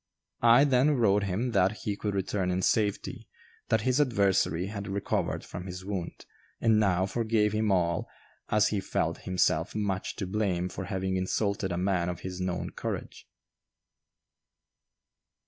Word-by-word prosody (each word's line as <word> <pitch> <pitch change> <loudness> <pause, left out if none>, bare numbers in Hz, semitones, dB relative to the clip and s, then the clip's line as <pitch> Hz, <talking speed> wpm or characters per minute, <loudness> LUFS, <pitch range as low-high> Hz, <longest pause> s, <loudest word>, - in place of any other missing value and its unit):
I 120 +3 +7
then 140 +1 +3
wrote 105 -3 +3
him 105 +7 -1
that 100 0 +2
"he 105 - -1
could 105 0 -3
return 95 -1 -1
in 90 +1 0
safety; 105 -1 0 0.4
that 110 -1 +3
his 130 +5 +2
adversary 100 - +2
had 100 0 -5
recovered 100 0 -2
from 90 +2 -7
his 90 0 -7
wound, 95 -4 -5 0.3
and 110 -2 +4
now 95 -3 +2
forgave 110 0 +1
him 110 -1 +1
all, 85 -3 +1 0.4
as 105 -1 +3
he 105 - 0
felt 95 - -1
himself 85 -3 +1
much 100 -3 -2
to 95 - -3
blame 95 -3 -1
for 90 - -6
having 95 0 -2
insulted 95 +1 -1
a 85 - -1
man 90 -1 0
of 90 - -5
his 90 -1 -5
known 90 -1 -2
courage." - - -6
100 Hz, 150 wpm, -29 LUFS, 90-105 Hz, 0.4 s, I